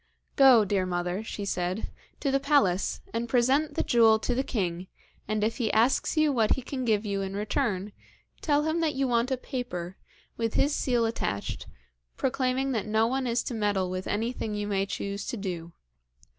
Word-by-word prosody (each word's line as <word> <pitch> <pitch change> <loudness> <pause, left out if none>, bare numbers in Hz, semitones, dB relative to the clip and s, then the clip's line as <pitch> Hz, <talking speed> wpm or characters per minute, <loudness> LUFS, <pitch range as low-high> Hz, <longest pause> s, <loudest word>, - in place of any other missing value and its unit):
'Go, 255 -6 +7
dear 190 -2 0
mother,' 180 +3 -2
she 205 -2 -5
said, 180 +2 -2 0.3
'to 275 - 0
the 275 - +2
palace, 275 -11 +2
and 230 +1 -2
present 270 +5 +2
the - - +1
jewel 225 -2 +5
to 230 +3 -2
the 255 - +1
king, 185 -8 -2 0.4
and 215 0 0
if 225 +2 0
he 230 -5 0
asks 240 +7 +2
you 310 -2 +4
what 225 -4 +3
he 265 - -6
can 260 0 -4
give 215 -2 +1
you 200 -1 -1
in 195 0 -4
return, 210 -1 -1 0.5
tell 295 -1 +2
him 315 +2 0
that 315 -3 0
you 270 0 +1
want 240 0 +1
a 260 - 0
paper, 195 -9 -5 0.4
with 225 -1 -2
his 285 - +2
seal 245 -5 +1
attached, 100 - -3 0.5
proclaiming 265 0 0
that 220 -4 -2
no 220 +1 +3
one 260 +2 -1
is 235 0 0
to - - -4
meddle 205 -4 0
with 185 0 -4
anything 220 0 -2
you 205 0 -2
may 195 -1 0
choose 200 +1 -4
to 240 - -3
do. 175 -4 -5
225 Hz, 190 wpm, -28 LUFS, 200-260 Hz, 0.5 s, Go